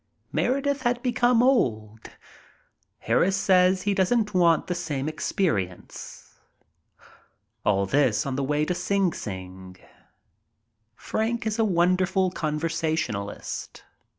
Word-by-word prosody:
Meredith 275 +2 0
had 240 0 -1
become 245 -1 +3
old. 110 - 0 0.9
Harris 195 +1 +1
says 185 0 +3
he 205 - +1
doesn't 210 +2 +1
want 170 -3 +3
the 180 - -2
same 150 -6 -3
experi 155 - 0
ence. 90 - -13 1.2
All 100 -1 +2
this 130 -1 +2
on 135 -2 -2
the 140 - -1
way 150 +2 0
to 180 - -1
Sing 195 -1 0
Sing. 95 -1 -8 1.2
Frank 230 - -2
is 220 +1 -2
a - - +4
wonderful 185 0 +2
conversationalist. 155 - -3
175 Hz, 110 wpm, -25 LUFS, 135-210 Hz, 1.2 s, a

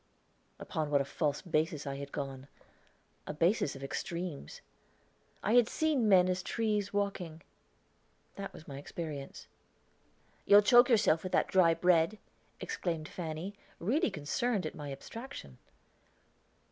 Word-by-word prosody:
Upon 155 -4 -3
what 145 -1 +3
a 140 - 0
false 145 +1 -1
basis 160 -3 -1
I 135 -1 -4
had 140 0 -7
gone 135 -1 -5 0.8
a - - -4
basis 170 -2 +2
of 135 - -9
extremes. 170 - -5 0.8
I 215 - +1
had 245 -2 +5
seen 290 -8 +1
men 185 -2 +6
as 185 0 0
trees 210 -1 -1
walking; 190 -5 -3 0.9
that 195 0 -6
was 155 - -13
my 140 -2 -7
experience. 145 -2 -7 1.0
"You'll 205 +1 +8
choke 245 +3 +7
yourself 205 -9 +4
with 185 - -6
that - - +2
dry 170 -3 +5
bread," 175 +3 +3 0.4
exclaimed 165 -4 -3
Fanny, 170 +3 -5 0.3
really 280 - +1
concerned 190 +8 -1
at 155 - -4
my 145 -2 -7
abstraction. 135 - -9
170 Hz, 135 wpm, -32 LUFS, 150-205 Hz, 1.0 s, You'll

